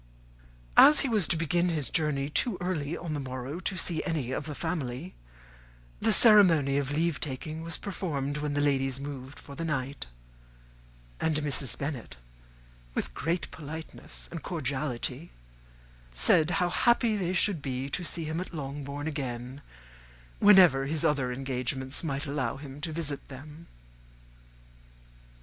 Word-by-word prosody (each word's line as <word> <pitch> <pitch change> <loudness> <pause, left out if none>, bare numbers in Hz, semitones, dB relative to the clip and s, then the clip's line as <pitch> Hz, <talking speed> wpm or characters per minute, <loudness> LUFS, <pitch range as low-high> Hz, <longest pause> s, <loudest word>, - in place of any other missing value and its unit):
As 300 0 +9
he - - +1
was 215 -6 +2
to 170 - +1
begin 170 +2 +1
his 150 -7 -1
journey 145 -3 +1
too 190 - +1
early 170 -4 -2
on 165 -2 -4
the 150 - -2
morrow 130 +3 -5
to 190 0 -2
see 170 -2 -1
any 155 -8 -2
of 140 - -3
the 150 - -5
family, 160 -1 -3 0.9
the 225 - +3
ceremony 170 - +6
of 140 -2 -2
leave 160 +2 0
taking 155 +3 -4
was 165 0 -3
performed 150 -8 -3
when 150 -1 -2
the 145 - +2
ladies 135 -2 +1
moved 140 -1 -7
for 140 - -11
the 165 - -5
night; 140 - -3 1.1
and 160 -1 +1
Mrs. 145 -3 0
Bennet, 130 - -5 0.8
with - - -2
great 165 +4 -2
politeness 160 +1 -8
and 165 -2 -5
cordiality, 140 -1 -3 0.9
said 155 - +5
how 180 -2 +1
happy 235 -1 +3
they 185 -3 -1
should 180 -2 +1
be 130 -1 -3
to 180 - -1
see 170 -1 -2
him 160 +2 -3
at 185 - -7
Longbourn 140 0 -5
again, 130 -3 -4 0.8
whenever 180 -10 +7
his 160 +2 -1
other 135 -5 +1
engagements 130 +2 -2
might 145 -2 -2
allow 140 -5 -2
him 140 0 -9
to 165 0 -3
visit 150 -3 -3
them. 150 +5 -11
150 Hz, 145 wpm, -29 LUFS, 135-170 Hz, 1.1 s, As